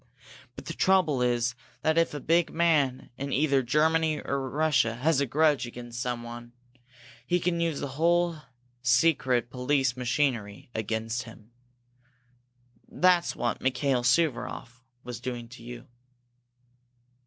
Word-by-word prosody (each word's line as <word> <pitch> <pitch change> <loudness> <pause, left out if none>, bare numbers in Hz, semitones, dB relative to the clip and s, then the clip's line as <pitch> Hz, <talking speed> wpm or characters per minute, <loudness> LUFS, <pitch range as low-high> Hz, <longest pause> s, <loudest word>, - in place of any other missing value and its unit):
But - - -10
the 165 - -5
trouble 170 -8 +2
is 120 0 +1 0.3
that 160 0 +2
if 165 -2 +2
a - - -3
big 165 +4 +2
man 150 -8 +1
in 140 +1 -4
either 140 0 +2
Germany 155 +4 +2
or 135 -1 -3
Russia 145 -5 +1
has 140 +3 +1
a 140 - 0
grudge 150 -1 +2
against 120 0 -8
someone, 120 -1 -5 0.7
he 175 - +2
can 170 0 -1
use 165 -4 -1
that - - -2
whole 170 +4 +1 0.4
secret 125 -2 +2
police 130 0 0
machinery 120 -5 -2
against 110 +2 -3
him. 110 0 -14 1.4
That's 180 -1 +2
what 120 -2 -2
Mikail 130 0 +1
Suvaroff 125 -2 0 0.2
was 125 -1 -7
doing 120 -2 -5
to 120 0 -12
you." 120 0 -9
130 Hz, 130 wpm, -27 LUFS, 120-155 Hz, 1.4 s, trouble